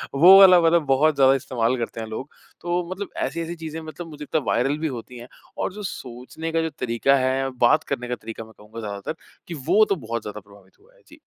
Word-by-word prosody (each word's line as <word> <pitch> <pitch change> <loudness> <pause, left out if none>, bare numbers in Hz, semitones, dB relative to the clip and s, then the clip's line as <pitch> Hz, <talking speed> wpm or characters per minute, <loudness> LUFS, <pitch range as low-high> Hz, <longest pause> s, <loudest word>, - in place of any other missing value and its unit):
वो 185 +7 +9
वाला 185 -2 +8
मतलब 165 -1 +3
बहुत 140 +3 +3
ज़्यादा 135 -1 +5
इस्तेमाल 130 -2 -1
करते 115 -1 -5
हैं 110 - -6
लोग। 110 +6 -6 0.3
तो 175 +1 -1
मतलब 195 +1 -5 0.2
ऐसी-ऐसी 165 +4 -4
चीज़ें 160 -1 -7
मतलब 160 +2 -9
वो 150 - -11
जितना 150 +1 -2
वायरल 135 +5 +1
भी 160 - -1
होती 120 +2 -10
हैं। 120 +1 -10 0.3
और - - -2
जो 210 +1 -8
सोचने 130 +6 -7
का 165 0 +1
जो 160 - -2
तरीका 125 +3 +2
है। 130 +1 0 0.2
बात 155 +6 +4
करने 125 -3 -4
का 125 - -2
तरीका 115 0 -8
मैं 110 - -17
कहूँगा 105 +2 -11
ज़्यादातर 100 +6 -5 0.3
कि 170 - -6
वो 215 +1 +5
तो 200 - 0
बहुत 115 0 -3
ज़्यादा 105 0 -7
प्रभावित 100 -1 -21
हुआ - - -26
है। - - -26
जी। - - -17
135 Hz, 230 wpm, -23 LUFS, 115-165 Hz, 0.3 s, वो